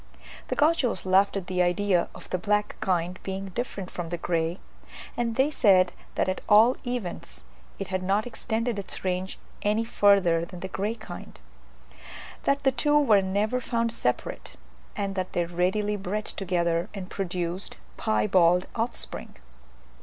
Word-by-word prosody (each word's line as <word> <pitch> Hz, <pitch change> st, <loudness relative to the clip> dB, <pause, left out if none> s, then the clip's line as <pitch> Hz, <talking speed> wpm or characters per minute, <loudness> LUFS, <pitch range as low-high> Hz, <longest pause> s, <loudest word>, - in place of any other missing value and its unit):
The -, -, -2 dB
Gauchos 290 Hz, -, +2 dB
laughed 195 Hz, +2 st, +4 dB
at 190 Hz, -, -4 dB
the 180 Hz, 0 st, 0 dB
idea 180 Hz, 0 st, +2 dB
of -, -, -11 dB
the 185 Hz, -, 0 dB
black 210 Hz, +2 st, 0 dB
kind 180 Hz, -1 st, -1 dB
being 195 Hz, 0 st, -5 dB
different 195 Hz, -3 st, -5 dB
from 175 Hz, -2 st, -5 dB
the 175 Hz, -, -3 dB
grey, 165 Hz, 0 st, -1 dB, 0.6 s
and 235 Hz, -1 st, -1 dB
they 265 Hz, +4 st, +3 dB
said 190 Hz, -9 st, +4 dB, 0.2 s
that -, -, +1 dB
at 185 Hz, -, -2 dB
all 225 Hz, +4 st, +7 dB
events 180 Hz, -, -5 dB, 0.3 s
it 195 Hz, -, -5 dB
had 185 Hz, 0 st, -1 dB
not 195 Hz, +3 st, +1 dB
extended 230 Hz, -1 st, -2 dB
its 195 Hz, -, -6 dB
range 185 Hz, 0 st, -2 dB, 0.2 s
any 210 Hz, +2 st, +1 dB
further 195 Hz, -7 st, +4 dB
than 175 Hz, +1 st, -8 dB
the 190 Hz, -, -3 dB
grey 205 Hz, +4 st, -2 dB
kind; 175 Hz, -, -10 dB, 1.1 s
that 280 Hz, 0 st, +2 dB
the 270 Hz, -, +4 dB
two 295 Hz, +4 st, +2 dB
were 220 Hz, -9 st, +5 dB
never 205 Hz, +6 st, 0 dB
found 230 Hz, -1 st, 0 dB
separate; 125 Hz, -, -2 dB, 0.4 s
and 200 Hz, -1 st, -2 dB
that 185 Hz, -1 st, -3 dB
they 175 Hz, -, +1 dB
readily 190 Hz, +5 st, 0 dB
bred 205 Hz, +2 st, -3 dB
together, 175 Hz, -1 st, -1 dB
and 190 Hz, -2 st, -7 dB
produced 180 Hz, -1 st, -3 dB, 0.2 s
piebald 170 Hz, -, +3 dB
offspring. 230 Hz, +1 st, 0 dB
195 Hz, 155 wpm, -27 LUFS, 180-220 Hz, 1.1 s, all